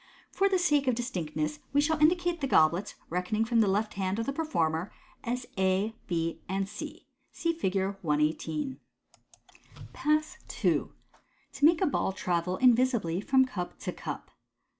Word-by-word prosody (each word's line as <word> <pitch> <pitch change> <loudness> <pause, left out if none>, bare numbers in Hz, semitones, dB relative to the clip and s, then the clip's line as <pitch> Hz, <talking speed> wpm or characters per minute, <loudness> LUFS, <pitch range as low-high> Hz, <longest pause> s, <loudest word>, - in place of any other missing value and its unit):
For 395 0 +2
the 380 - +3
sake 295 -6 +2
of 255 - +3
distinctness, 155 - -3
we 285 - +4
shall 315 +1 +2
indicate 345 +1 +3
the 275 - 0
goblets 170 -1 +3 0.2
(reckoning 180 +6 0
from 230 0 +2
the 215 - +4
left 210 +3 0
hand 190 0 -1
of 230 - -2
«&e - - +1
performer) 180 - -1 0.3
as 245 +1 -2
A, 190 +3 +2
B, 165 -2 -2
and 195 0 -1
C. 210 +1 -8 0.3
(See 335 0 -1
Fig. 200 - -2 0.3
118.) 155 - -1 1.1
Pass 305 +1 0 0.3
II. - - +3 0.7
To 285 - +2
make 330 +3 +5
a - - +4
Ball 260 - 0
Travel 180 0 -1
invisibly 240 -8 +3
from 260 +4 +4
Cup 180 -8 -5
tc - - -5
Cup. - - -6
215 Hz, 155 wpm, -29 LUFS, 180-280 Hz, 1.1 s, make